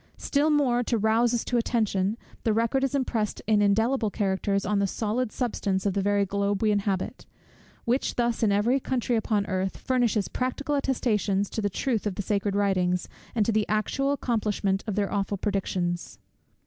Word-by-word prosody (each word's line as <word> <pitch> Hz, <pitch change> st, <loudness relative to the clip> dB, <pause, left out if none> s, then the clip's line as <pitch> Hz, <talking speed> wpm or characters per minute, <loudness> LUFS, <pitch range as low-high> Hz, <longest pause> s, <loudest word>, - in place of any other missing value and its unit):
Still 290 Hz, +2 st, +1 dB
more 270 Hz, -5 st, +3 dB
to 235 Hz, -, +1 dB
rouse 225 Hz, +2 st, +3 dB
us 240 Hz, -2 st, -1 dB
to 245 Hz, -, 0 dB
attention, 215 Hz, -3 st, 0 dB, 0.3 s
the 220 Hz, -, +2 dB
record 230 Hz, +5 st, +1 dB
is 270 Hz, 0 st, 0 dB
impressed 235 Hz, -6 st, -1 dB
in 215 Hz, -1 st, +3 dB
indelible 220 Hz, +3 st, +2 dB
characters 200 Hz, 0 st, 0 dB
on 205 Hz, -1 st, +1 dB
the 200 Hz, -, +2 dB
solid 220 Hz, +4 st, -1 dB
substance 200 Hz, -6 st, -1 dB
of 200 Hz, -, +1 dB
the 200 Hz, -, 0 dB
very 200 Hz, 0 st, +2 dB
globe 200 Hz, +1 st, -1 dB
we 215 Hz, -, +4 dB
inhabit; 200 Hz, -2 st, -2 dB, 0.6 s
which 245 Hz, +3 st, 0 dB
thus, 240 Hz, -1 st, 0 dB
in 215 Hz, -3 st, +3 dB
every 225 Hz, +7 st, +2 dB
country 250 Hz, -2 st, -1 dB
upon 215 Hz, -2 st, 0 dB
earth, 190 Hz, -1 st, -2 dB
furnishes 235 Hz, -6 st, +1 dB
practical 260 Hz, +3 st, -2 dB
attestations 215 Hz, -8 st, 0 dB
to 220 Hz, -, -2 dB
the 205 Hz, -, 0 dB
truth 220 Hz, +2 st, -1 dB
of 195 Hz, -, -3 dB
the 205 Hz, -, -3 dB
sacred 200 Hz, 0 st, 0 dB
writings, 185 Hz, -3 st, +1 dB, 0.3 s
and 215 Hz, -3 st, +2 dB
to 230 Hz, -, +2 dB
the 215 Hz, -1 st, 0 dB
actual 245 Hz, +6 st, 0 dB
accomplishment 210 Hz, -7 st, 0 dB
of 210 Hz, -, -2 dB
their 205 Hz, -1 st, -1 dB
awful 200 Hz, 0 st, -1 dB
predictions. 180 Hz, -, -2 dB
210 Hz, 180 wpm, -26 LUFS, 200-240 Hz, 0.6 s, we